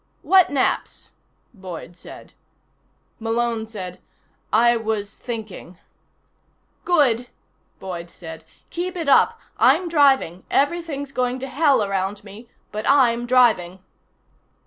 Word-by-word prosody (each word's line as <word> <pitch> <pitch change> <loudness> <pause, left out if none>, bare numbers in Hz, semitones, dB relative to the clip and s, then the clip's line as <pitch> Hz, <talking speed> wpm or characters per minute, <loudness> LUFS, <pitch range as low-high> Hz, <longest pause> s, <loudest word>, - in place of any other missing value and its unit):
"What 375 -2 +5
naps?" 275 -2 -2 0.4
Boyd 185 -4 -9
said. - - -13 0.9
Malone 225 0 -1
said: 185 -5 -8 0.5
"I 235 +2 +4
was 215 -2 -3
thinking 220 -7 -7 0.5
" - - -44
"Good," 255 -9 +2 0.5
Boyd 175 -2 -7
said. 160 -2 -10 0.3
"Keep 360 +1 -4
it 330 -4 -4
up. 455 +11 +4 0.2
I'm 365 - +4
driving. 275 - +2
Everything's 285 -2 -1
going 250 -1 -1
to 270 - -4
hell 275 -2 +2
around 195 0 -2
me, 215 +4 -13 0.2
but 215 +1 -3
I'm 240 -4 +3
driving." 225 -8 +3
235 Hz, 110 wpm, -22 LUFS, 200-280 Hz, 0.9 s, What